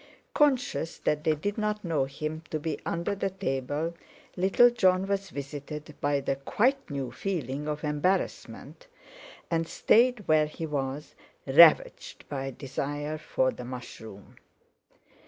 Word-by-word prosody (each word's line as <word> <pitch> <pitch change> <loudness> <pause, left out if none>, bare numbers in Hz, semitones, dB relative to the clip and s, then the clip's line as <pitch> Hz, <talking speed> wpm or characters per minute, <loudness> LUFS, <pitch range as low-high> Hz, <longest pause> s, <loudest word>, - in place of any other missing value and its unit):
Conscious 265 - +1
that 150 0 -1
they 160 -2 +2
did 205 +8 -3
not 210 0 -1
know 160 -5 +1
him 155 +3 -5
to 155 - -2
be 155 0 -3
under 170 +3 -1
the 195 0 -1
table, 155 -3 -2 0.4
little 195 +7 +5
Jon 190 -5 +3
was 195 0 -2
visited 145 +2 -7
by 145 0 +1
the 135 0 -2
quite 255 - 0
new 135 -4 -4
feeling 150 -3 -3
of 150 0 -3
embarrassment, 180 - -2 0.6
and 165 -1 0
stayed 235 +1 +3
where 155 -1 +4
he 155 +2 -6
was, 140 -1 -4 0.3
ravaged 155 +4 +5
by 135 -2 -3
desire 145 +3 -4
for 130 -3 0
the 125 - -9
mushroom. 115 -5 -9
155 Hz, 135 wpm, -28 LUFS, 140-190 Hz, 0.6 s, little